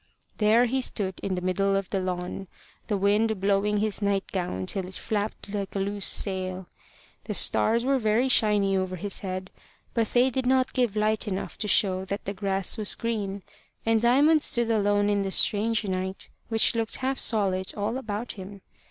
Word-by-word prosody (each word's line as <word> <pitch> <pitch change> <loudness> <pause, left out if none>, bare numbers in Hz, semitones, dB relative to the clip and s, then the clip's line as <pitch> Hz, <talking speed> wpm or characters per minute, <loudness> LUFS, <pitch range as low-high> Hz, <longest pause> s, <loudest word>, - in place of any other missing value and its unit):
There 220 +3 +4
he 260 +2 -1
stood 190 -7 -1
in 190 -1 -2
the 180 - -4
middle 195 +2 +1
of 195 -1 -3
the 195 - 0
lawn, 185 +1 -4 0.4
the 205 - 0
wind 210 +2 +1
blowing 200 +1 +1
his 215 0 -1
night 200 -1 +1
gown 175 - -3
till 190 - -3
it 185 - -9
flapped 210 -1 -4
like 200 -1 -4
a - - 0
loose 200 0 0
sail. 185 -1 0 0.6
The - - -2
stars 235 +2 +3
were 270 0 +2
very 220 +3 +2
shiny 210 -5 +3
over 185 -1 -1
his 200 +3 -3
head; 185 -1 -5 0.4
but 230 -2 +1
they 250 +3 +2
did 260 0 -2
not 260 0 +2
give 245 -5 0
light 215 +1 +1
enough 190 -1 -4
to 210 - -1
show 190 -2 +2
that 200 +2 -5
the 200 - -3
grass 195 0 -1
was 210 - +3
green; 205 -4 -3 0.4
and 225 -1 +2
Diamond 285 +6 +4
stood 235 -4 +3
alone 205 -1 +2
in 205 -1 +1
the 195 - -2
strange 215 +3 +2
night, 190 0 -3 0.2
which 225 0 +4
looked 225 -1 -1
half 265 +1 -2
solid 190 -4 0
all 210 +3 -2
about 220 -1 -5
him. 195 0 -10
205 Hz, 185 wpm, -26 LUFS, 195-225 Hz, 0.6 s, There